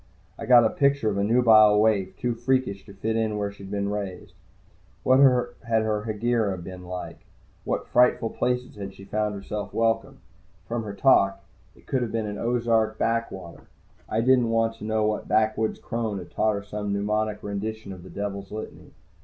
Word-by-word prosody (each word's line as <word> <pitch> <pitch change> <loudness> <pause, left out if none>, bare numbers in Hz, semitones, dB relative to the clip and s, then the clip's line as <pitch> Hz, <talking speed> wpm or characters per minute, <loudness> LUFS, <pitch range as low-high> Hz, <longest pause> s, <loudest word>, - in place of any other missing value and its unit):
I - - -8
got 120 -2 +7
a 110 - +2
picture 140 -6 +2
of 100 - -2
a - - +1
nubile 110 -2 +6
waif, 100 -4 +1
too 125 -1 -1
freakish 120 -4 -1
to 100 - -11
fit 110 +3 -2 0.2
where 100 -1 -2
she'd 100 -1 -11
been 100 0 -2
raised. 100 -3 -5 0.7
What 130 +1 +5
had 120 -4 +2
her 105 -1 -1
Hegira 110 -2 0
been 90 +1 -9
like? 90 0 -6
In - - -28 0.5
what - - -2
frightful 125 -2 +3
places 125 -2 -2
had 100 -1 -7
she 100 - -12
found 105 0 -1
herself 100 +1 -6
welcome? 115 +4 0 0.5
From 120 0 -2
her 100 -1 -6
talk, 100 -6 +3 0.3
it - - -21
could 130 - -1
have 120 -3 -2
been 115 -1 -1
an 105 -1 -5
Ozark 115 -2 +1
backwater. 115 -7 -3 0.4
I 110 - +1
didn't 125 -1 +3
want 115 0 +1
to 105 - -8
know 110 0 +1
what 105 0 -1
backwoods 110 0 +1
crone 115 -3 -3
had 90 -2 -9
taught 110 0 +1
her 100 - -5
some 105 0 -4
mnemonic 105 +1 -1
rendition 105 0 -5
of 90 - -11
the 95 - -12
Devil's 100 -1 -5
Litany. 110 +1 -8
110 Hz, 185 wpm, -25 LUFS, 100-115 Hz, 0.7 s, got